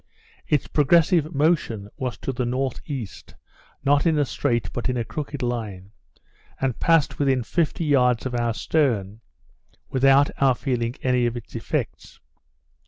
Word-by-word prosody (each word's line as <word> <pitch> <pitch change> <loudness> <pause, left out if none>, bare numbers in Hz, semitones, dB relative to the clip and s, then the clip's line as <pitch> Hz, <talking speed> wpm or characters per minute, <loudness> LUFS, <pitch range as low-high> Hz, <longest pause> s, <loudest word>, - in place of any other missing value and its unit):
Its 150 - +1
progressive 160 +1 +3
motion 140 -9 +1
was 125 -2 -4
to - - -4
the 125 0 -2
north 130 +1 -2
east, 130 - -7 0.5
not 145 +3 +3
in 160 -2 +3
a 145 - +2
straight 120 -4 -1
but 120 - -2
in 125 - -1
a 120 - 0
crooked 145 +2 -5
line, 105 -6 -4 0.7
and 130 -3 -1
passed 165 -3 +2
within 135 -3 +2
fifty 165 +4 -1
yards 125 -5 +3
of 130 - -3
our 120 -2 0
stern, 110 -10 0 0.7
without 135 +2 +4
our 135 -2 +4
feeling 120 -3 -2
any 125 -2 +2
of 120 0 -3
its 120 - -10
effects. - - -4
130 Hz, 150 wpm, -24 LUFS, 120-145 Hz, 0.7 s, without